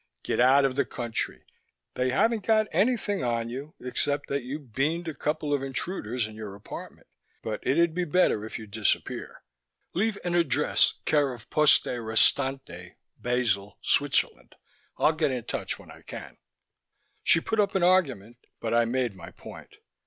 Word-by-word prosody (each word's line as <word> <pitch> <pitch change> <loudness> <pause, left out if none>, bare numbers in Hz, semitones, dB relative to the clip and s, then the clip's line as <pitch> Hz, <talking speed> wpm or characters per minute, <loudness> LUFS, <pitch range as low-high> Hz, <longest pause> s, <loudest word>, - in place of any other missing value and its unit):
Get - - -1
out 135 +3 +6
of 130 -1 0
the 140 - +3
country. 120 -2 -4 0.5
They 125 0 0
haven't 220 - +2
got 215 +1 +3
anything 205 - +1
on 115 -1 -1
you 140 +5 -7
except 145 +3 -2
that 140 0 0
you 130 +4 -5
beaned 150 +6 -2
a 160 - -3
couple 150 0 -2
of 140 - +1
intruders 130 - -2
in 110 - -9
your 105 -3 -7
apartment, 100 - -10 0.4
but 110 -1 -3
it'll 165 +6 +3
be 180 +3 -2
better 160 - +2
if 110 - -6
you 110 - -8
disappear. 105 0 -2 0.5
Leave 210 +3 0
an 175 -1 -1
address 170 -7 +3
care 145 -3 +3
of 120 -2 -11
Poste 150 -1 +5
Restante, 115 -4 +1 0.2
Basel, 110 -5 0
Switzerland. - - +1 0.4
I'll 155 - +4
get 155 -1 +1
in 125 -3 -3
touch - - -3
when - - -14
I - - -14
can." - - -9 0.9
She - - +5
put 220 +6 -2
up 200 -2 +2
an 190 - +2
argument 135 - +2 0.2
but 115 0 -2
I 120 0 +4
made 120 -2 -1
my 90 -3 -10
point. - - -12
135 Hz, 165 wpm, -27 LUFS, 115-165 Hz, 0.9 s, out